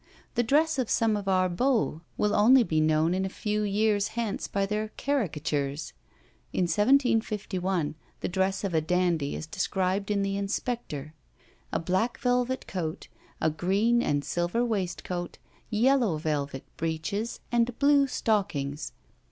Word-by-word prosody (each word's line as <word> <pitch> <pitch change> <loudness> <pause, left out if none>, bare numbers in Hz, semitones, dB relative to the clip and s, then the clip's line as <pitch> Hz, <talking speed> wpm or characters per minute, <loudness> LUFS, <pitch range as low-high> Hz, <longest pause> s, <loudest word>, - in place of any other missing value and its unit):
The 240 - +2
dress 290 +5 +2
of 250 - 0
some 225 -2 +2
of 200 -1 -4
our 185 -1 +3
beaux 215 - +1 0.2
will 210 0 +1
only 245 +5 +6
be 155 -7 +1
known 155 +2 +3
in 190 +1 0
a 190 - -1
few 210 +2 -2
years 205 0 +2
hence 225 -4 -2
by 195 0 0
their 210 +2 -2
caricatures. 150 - -1 0.6
In - - +1
1751 205 - +1 0.3
the - - -1
dress 190 +2 0
of 195 -3 -2
a 160 - +3
dandy 170 -3 +1
is - - -5
described 190 +4 -1
in 200 -1 +1
the 195 0 -1
Inspector. 195 - -3 0.6
A - - 0
black 185 +8 0
velvet 250 +1 0
coat, 165 -4 -4 0.3
a 160 - +2
green 200 +9 +2
and 145 - 0
silver 175 +10 0
waistcoat, 185 -4 -3 0.3
yellow 235 - +3
velvet 145 -3 -2
breeches, 165 +8 -2
and 240 0 +1
blue 280 -1 +4
stockings. 155 - -1
195 Hz, 145 wpm, -28 LUFS, 165-230 Hz, 0.6 s, only